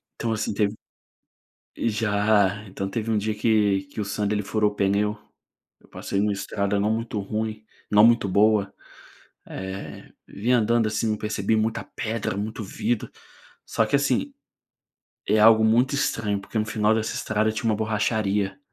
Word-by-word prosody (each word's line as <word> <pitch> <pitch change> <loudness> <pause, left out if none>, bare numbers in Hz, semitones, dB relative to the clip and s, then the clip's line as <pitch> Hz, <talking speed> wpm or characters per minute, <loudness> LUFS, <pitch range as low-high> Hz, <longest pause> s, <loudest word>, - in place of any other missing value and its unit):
Então 115 - -2
assim 105 -1 -2
teve, 100 0 +1 1.0
ih, - - 0
já, 105 -1 +2
então 95 +1 -4
teve 115 +2 -3
um 110 - +2
dia 105 +1 -1
que 105 -3 +2
que 95 +3 -8
o - - -1
Sandro 105 +1 -1
ele 105 - -1
furou 105 0 +1
o - - -12
pneu, 105 +1 +1 0.6
eu - - -23
passei 100 - -4
em - - +2
uma 105 - +1
estrada 100 0 -2
não 105 +2 +1
muito 115 -1 -3
ruim, 110 +1 -4 0.3
não 105 0 +6
muito 115 -3 +3
boa, 100 +1 +3 0.7
eh, 95 +1 -7
vinha 120 +5 +1
andando, 115 0 +2
assim, 110 0 -1
percebi 105 0 -1
muita 110 +1 0
pedra, 110 -3 -2
muito 110 +2 -4
vidro, 115 +3 -2 0.6
só - - +1
que, - - +2
assim, - - 0 0.9
é 110 - +3
algo 110 0 +7
muito 120 +5 +3
estranho, 110 -7 -1
porque 100 +3 -5
no 110 - 0
final 105 0 +1
dessa 110 0 -2
estrada 110 0 0
tinha 115 +1 -4
uma 105 - +1
borracharia, 105 -1 -1
105 Hz, 165 wpm, -24 LUFS, 100-110 Hz, 1.0 s, algo